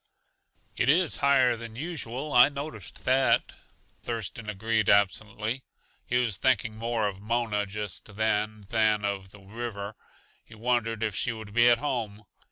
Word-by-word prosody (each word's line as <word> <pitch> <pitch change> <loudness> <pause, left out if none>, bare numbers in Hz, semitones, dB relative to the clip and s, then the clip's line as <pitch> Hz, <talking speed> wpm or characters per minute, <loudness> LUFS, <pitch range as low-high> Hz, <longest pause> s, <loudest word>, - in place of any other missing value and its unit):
"It 125 - +1
is 170 +3 +4
higher 130 -3 +4
than 115 -1 -8
usual; 145 -2 -4
I 125 +3 +8
noticed 140 -9 -7
that," 130 +1 +3 0.5
Thurston 115 -1 -4
agreed 110 +1 0
absently. 110 +4 +1 0.4
He 125 - +1
was 115 -6 0
thinking 115 -4 +2
more 115 -1 -1
of 100 -1 -6
Mona 110 -2 -1
just 100 0 -5
then 110 0 0
than 110 -2 +2
of 100 -2 -3
the 105 +1 -15
river. 100 0 -6 0.5
He 110 - -15
wondered 115 -1 0
if 110 -3 -1
she 125 - 0
would 110 -2 -9
be 120 +1 +6
at 120 - +5
home. 115 -6 -3
110 Hz, 150 wpm, -27 LUFS, 105-120 Hz, 0.5 s, I